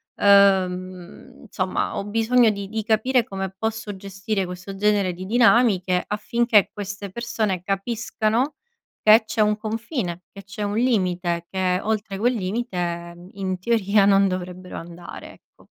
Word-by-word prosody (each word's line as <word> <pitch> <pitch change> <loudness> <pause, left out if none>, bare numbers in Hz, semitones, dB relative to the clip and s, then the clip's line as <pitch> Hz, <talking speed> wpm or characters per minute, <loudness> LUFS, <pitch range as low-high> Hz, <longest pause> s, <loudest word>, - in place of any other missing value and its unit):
ehm, 185 -2 +2
insomma 190 -5 -2
ho 200 - -3
bisogno 225 +2 +3
di 200 -1 -6
di 220 +1 -3
capire 230 +3 +2
come 195 -2 -4
posso 220 -1 -4
gestire 195 +1 -3
questo 180 +2 -8
genere 200 -2 +2
di 185 +2 -8
dinamiche, 210 -5 +3
affinché 215 0 +2
queste 200 0 -6
persone 215 -4 -2
capiscano 220 - -1 0.5
che 220 +1 +7
c'è 215 0 -1
un 210 0 +2
confine, 220 - -4
che 200 - -11
c'è 205 +1 -8
un 205 +1 -2
limite 180 -8 0
che 185 -1 0
oltre 215 -2 -2
quel 245 +5 +2
limite, 180 -5 -4
in 190 -2 -3
teoria, 205 -1 +2
non 195 0 +5
dovrebbero 185 0 -6
andare, 170 +1 -10
ecco. - - -24
200 Hz, 135 wpm, -23 LUFS, 185-220 Hz, 0.5 s, che